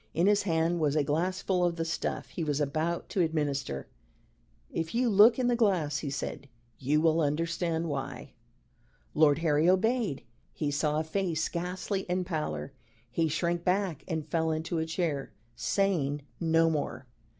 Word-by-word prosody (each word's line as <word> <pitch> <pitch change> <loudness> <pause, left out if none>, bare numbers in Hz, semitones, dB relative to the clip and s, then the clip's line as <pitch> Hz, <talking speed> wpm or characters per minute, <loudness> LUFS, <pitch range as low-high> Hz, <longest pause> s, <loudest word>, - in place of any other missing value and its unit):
In 170 - +3
his 205 0 +4
hand 170 -2 +1
was 150 -2 +1
a 150 - +3
glass 175 +6 -1
full 185 -2 +1
of 175 -1 +1
the 165 -1 -2
stuff 165 - -3
he 170 - -4
was 145 -2 0
about 155 +4 -1
to 190 - 0
administer. 145 - -1 0.9
"If 165 +5 -3
you 245 +1 +2
look 210 +4 +7
in 255 - 0
the 245 0 +3
glass," 180 -11 +1
he 145 - -4
said, 140 0 -5 0.3
"you 145 +3 +2
will 165 +1 +3
understand 165 +2 0
why." 140 -1 -5 0.8
Lord 150 -2 +5
Harry 155 +2 +4
obeyed. 215 - +1 0.3
He 150 -2 -2
saw 150 +1 +1
a - - 0
face 165 -1 -1
ghastly 180 +3 -3
in 180 +1 +1
pallor: 155 -5 -3 0.4
he 165 +5 +1
shrank 170 +2 -1
back 185 -4 0
and 160 -4 -2
fell 160 +1 0
into 160 +1 -1
a 160 - -2
chair, 160 -5 -2 0.2
saying 150 - 0 0.2
no 165 0 +3
more. 145 -3 -3
165 Hz, 165 wpm, -29 LUFS, 150-180 Hz, 0.9 s, look